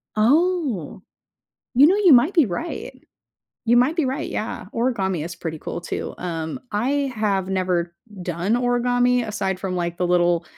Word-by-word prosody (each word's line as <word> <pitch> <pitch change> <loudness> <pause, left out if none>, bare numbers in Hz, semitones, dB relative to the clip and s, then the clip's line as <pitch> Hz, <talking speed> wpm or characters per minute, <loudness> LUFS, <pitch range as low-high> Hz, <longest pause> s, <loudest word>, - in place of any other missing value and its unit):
Oh. 265 - +1 0.7
You 270 +4 +8
know, 375 - +4
you 400 -5 +5
might 260 +10 +5
be 325 -6 +5
right. 230 - -5 0.6
You 240 +1 +4
might 265 +7 +2
be 325 - +2
right, 270 +4 -2
yeah. 215 -3 -4
Origami 195 -9 0
is 170 - -6
pretty 165 -2 -5
cool, 170 - -5
too. - - -5
Um, 165 +4 -4
I 270 +6 0
have 195 -3 0
never 180 -2 -1 0.3
done 175 +4 -1
origami 245 0 +2
aside 190 -3 -2
from, 185 -1 -3
like, 175 -1 -2
the 180 0 0
little 175 -1 +2
215 Hz, 160 wpm, -22 LUFS, 175-255 Hz, 0.7 s, You